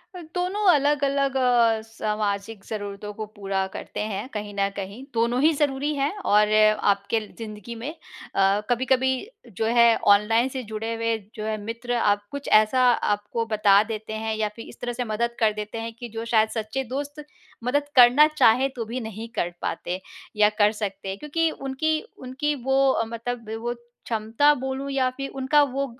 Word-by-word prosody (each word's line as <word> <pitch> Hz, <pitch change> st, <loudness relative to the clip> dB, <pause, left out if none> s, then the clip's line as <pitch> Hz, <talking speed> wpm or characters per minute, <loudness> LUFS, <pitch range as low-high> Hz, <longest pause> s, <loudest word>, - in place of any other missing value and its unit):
दोनों 360 Hz, +4 st, -3 dB
अलग-अलग 280 Hz, -1 st, +1 dB
अ, 240 Hz, -3 st, +3 dB
सामाजिक 210 Hz, -2 st, -3 dB
ज़रूरतों 205 Hz, -1 st, -6 dB
को 215 Hz, +1 st, -5 dB
पूरा 195 Hz, -1 st, -1 dB
करते -, -, -7 dB
हैं, 210 Hz, +1 st, -3 dB
कहीं 210 Hz, -1 st, -5 dB
न 195 Hz, 0 st, +2 dB
कहीं 200 Hz, +6 st, -6 dB
दोनों 235 Hz, +2 st, +1 dB
ही 310 Hz, +3 st, +5 dB
ज़रूरी 290 Hz, 0 st, 0 dB
हैं 280 Hz, 0 st, 0 dB, 0.2 s
और 210 Hz, 0 st, +5 dB, 0.4 s
आपके 200 Hz, +3 st, -1 dB, 0.2 s
ज़िंदगी 215 Hz, 0 st, -8 dB
में 230 Hz, +5 st, -5 dB, 0.5 s
अ, 195 Hz, +1 st, +3 dB
कभी-कभी 260 Hz, +1 st, +2 dB, 0.5 s
जो 220 Hz, -, 0 dB
है 235 Hz, 0 st, +5 dB, 0.2 s
ऑनलाइन 225 Hz, +4 st, +2 dB
से 260 Hz, -1 st, -5 dB
जुड़े 220 Hz, +1 st, -4 dB
हुए 230 Hz, 0 st, 0 dB, 0.2 s
जो 215 Hz, -, -5 dB
है 215 Hz, 0 st, -1 dB
मित्र 230 Hz, +3 st, -4 dB
आप 205 Hz, -3 st, +1 dB
कुछ 285 Hz, 0 st, -6 dB
ऐसा 215 Hz, +4 st, +4 dB
आपको 210 Hz, +1 st, -1 dB
बता 210 Hz, -2 st, +4 dB
देते 215 Hz, 0 st, -6 dB
हैं 220 Hz, 0 st, -2 dB
या 215 Hz, -1 st, -1 dB
फिर 230 Hz, -, -9 dB
इस -, -, -14 dB
तरह 245 Hz, 0 st, -3 dB
से 245 Hz, +1 st, -2 dB
मदद 235 Hz, +2 st, -1 dB
कर 220 Hz, -2 st, +3 dB
देते 210 Hz, +1 st, -6 dB
हैं 230 Hz, 0 st, -5 dB
कि 240 Hz, -, -7 dB
जो 225 Hz, +1 st, -5 dB
शायद 220 Hz, -1 st, +3 dB
सच्चे 220 Hz, +4 st, -3 dB
दोस्त 290 Hz, +1 st, -5 dB, 0.4 s
मदद 285 Hz, +4 st, 0 dB
करना 255 Hz, +4 st, +8 dB
चाहे 255 Hz, +3 st, +5 dB
तो 235 Hz, -2 st, -4 dB
भी 235 Hz, +4 st, -4 dB
नहीं 220 Hz, 0 st, -6 dB
कर 175 Hz, -, 0 dB
पाते 180 Hz, +2 st, -3 dB, 0.3 s
या 210 Hz, 0 st, +5 dB
कर 205 Hz, 0 st, +5 dB
सकते 200 Hz, -3 st, -5 dB
हैं 190 Hz, -, -4 dB
क्योंकि 325 Hz, +2 st, 0 dB
उनकी 310 Hz, +4 st, -1 dB, 0.2 s
उनकी 270 Hz, +4 st, -2 dB
वो 270 Hz, -1 st, +3 dB
मतलब 230 Hz, 0 st, -5 dB
वो 240 Hz, +1 st, -2 dB, 0.3 s
क्षमता 230 Hz, +6 st, +2 dB
बोलूँ 265 Hz, 0 st, -4 dB
या 265 Hz, -2 st, +1 dB
फिर 275 Hz, 0 st, -4 dB
उनका 270 Hz, +2 st, +3 dB
वो 275 Hz, +2 st, -1 dB
230 Hz, 175 wpm, -24 LUFS, 215-265 Hz, 0.5 s, करना